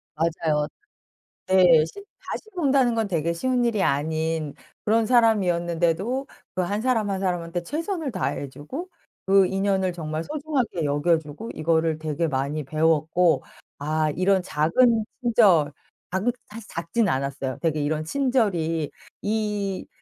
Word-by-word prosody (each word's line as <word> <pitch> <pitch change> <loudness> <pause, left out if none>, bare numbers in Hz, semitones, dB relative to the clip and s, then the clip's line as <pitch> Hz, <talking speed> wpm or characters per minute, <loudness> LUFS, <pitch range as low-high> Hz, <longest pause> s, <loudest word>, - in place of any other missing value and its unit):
맞아요. 155 -2 0 0.8
네 180 -4 +6
십 400 - -11 0.3
다시 - - -3
본다는 275 -8 +3
건 225 -2 0
되게 170 -2 0
쉬운 250 +8 0
일이 225 -4 +1
아닌 155 0 0 0.3
그런 220 +1 +3
사람이었는데도 195 0 +2 0.3
그 185 - 0
1 200 +4 -1
사람 225 -4 +1
1 190 -1 -2
사람한테 175 -2 -2
최선을 320 - -3
다해 145 - -2
주고 255 - -7 0.4
그 195 0 +5
인연을 190 -1 0
정말 160 -2 -4
소중하게 285 - -2
여겨 145 +4 +2
주고 160 +9 -8
이거를 160 0 +1
되게 155 +1 -1
많이 140 +2 -2
배웠고 160 +3 +2 0.4
아 155 +1 0
이런 190 +1 +2
작은 215 +9 +2 0.2
친절 200 - +4 0.4
작은 195 +6 +1 0.2
사실 220 0 -10
작진 170 +7 -1
않았어요. 135 -1 -2
되게 155 -3 0
'이런 155 +1 -1
친절이 180 - 0 0.3
이 210 -2 -2
175 Hz, 275 characters per minute, -24 LUFS, 155-220 Hz, 0.8 s, 네